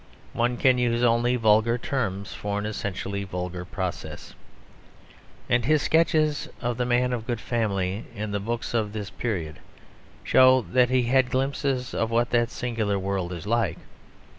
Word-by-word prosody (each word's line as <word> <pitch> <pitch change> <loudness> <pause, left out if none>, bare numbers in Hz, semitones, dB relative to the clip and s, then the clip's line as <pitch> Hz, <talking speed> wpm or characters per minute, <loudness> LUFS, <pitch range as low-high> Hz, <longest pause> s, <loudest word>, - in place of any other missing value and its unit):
(One 120 +1 0
can 130 -1 +4
use 120 -1 +1
only 120 +1 +3
vulgar 110 0 +3
terms 100 -7 -3
for 100 0 -3
an 105 - -2
essentially 100 -1 -3
vulgar 90 -1 -5
process.) 90 -1 -5 1.1
And 120 0 +2
his 155 +2 +3
sketches 155 -2 +2
of 120 -1 -2
the 125 -1 -1
man 125 +1 +2
of 115 -2 -4
good 120 -3 -2
family 100 -5 -1
in 105 0 -4
the 100 - -1
books 115 +4 -4
of 110 -3 0
this 105 -2 -5
period 85 -10 -3 0.6
show 130 0 +6
that 125 -1 +4
he 130 -1 +2
had 130 +2 +3
had - - -12
glimpses 135 -1 -1
of 115 - 0
what 120 +1 +1
that 120 -1 +2
singular 115 -5 -2
world 95 -2 -2
is 90 +1 -6
like. 115 +2 0
115 Hz, 165 wpm, -25 LUFS, 100-125 Hz, 1.1 s, show